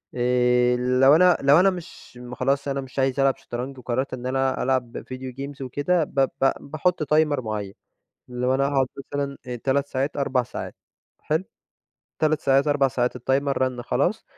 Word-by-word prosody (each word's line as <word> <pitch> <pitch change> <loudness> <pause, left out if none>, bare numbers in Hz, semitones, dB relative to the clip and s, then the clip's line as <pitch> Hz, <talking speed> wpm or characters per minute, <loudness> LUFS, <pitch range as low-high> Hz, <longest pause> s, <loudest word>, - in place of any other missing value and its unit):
آآ، 125 0 +2
لو 125 +3 +4
أنا 180 +1 +5
لو 140 +4 +6
أنا 195 +1 +5
مش 175 -8 -9
م 125 0 -9
خلاص 135 +2 0
أنا 140 0 -1
مش 130 +1 -7
عايز 135 +1 +1
ألعب 135 -1 +3
شطرنج 125 +3 -6
وقرَّرت 130 +2 -3
إن 125 -1 -6
أنا 130 +1 0
ألعب 125 -2 -1
video 130 -1 -7
games 140 0 -6
وكده 145 +7 0
ب 140 - -4 0.2
ب 135 - +5
باحط 155 +3 -1
تايمر 150 -1 +2
معيَّن، 105 -3 -4 0.5
لو 125 +1 -1
أنا 135 - +1
هأقعد 135 -2 +1 0.3
مثلًا 140 -1 -2 0.3
3 140 +1 +1
ساعات، 135 +2 -2
4 135 -3 +1
ساعات - - -7 0.4
حلو؟ 155 +4 -1 0.8
3 155 -1 +1
ساعات، 135 +2 +3
4 145 -2 +3
ساعات، 125 -1 -1
التايمر 135 +2 0
رنّ 125 -2 -1
خلاص، - - -1
135 Hz, 170 wpm, -24 LUFS, 125-140 Hz, 0.8 s, لو